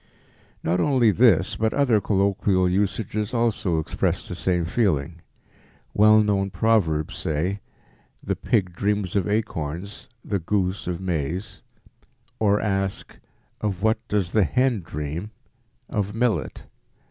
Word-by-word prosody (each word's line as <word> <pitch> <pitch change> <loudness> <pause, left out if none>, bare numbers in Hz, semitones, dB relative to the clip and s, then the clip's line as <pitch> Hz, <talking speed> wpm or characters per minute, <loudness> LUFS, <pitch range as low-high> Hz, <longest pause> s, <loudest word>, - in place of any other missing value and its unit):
Not 90 +2 +1
only 125 0 +4
this 100 -5 +4
but 110 0 0
other 125 -7 +3
colloquial 95 -1 +2
usages 105 +4 -1
also 110 -7 +1
express 80 - -1
the - - -5
same 90 -2 0
feeling. 85 - 0 0.7
Well 110 +1 +6
known 100 -2 +1
proverbs 90 -9 +1
say, 85 +6 -2 0.6
"The - - -1
pig 95 -6 0
dreams 100 -2 -1
of 100 -1 +1
acorns, 100 -3 -3 0.2
the 100 - -1
goose 95 +1 -1
of 90 -1 -2
maize," 90 +1 -3 0.8
or 105 -1 +3
ask, 95 -2 -2 0.4
"Of 100 -3 -2
what 110 0 +3
does 100 -4 0
the 110 - +3
hen 125 +5 +1
dream? 80 +4 -5 0.6
Of 105 0 -2
millet." 120 -1 -1
100 Hz, 125 wpm, -24 LUFS, 90-110 Hz, 0.8 s, Well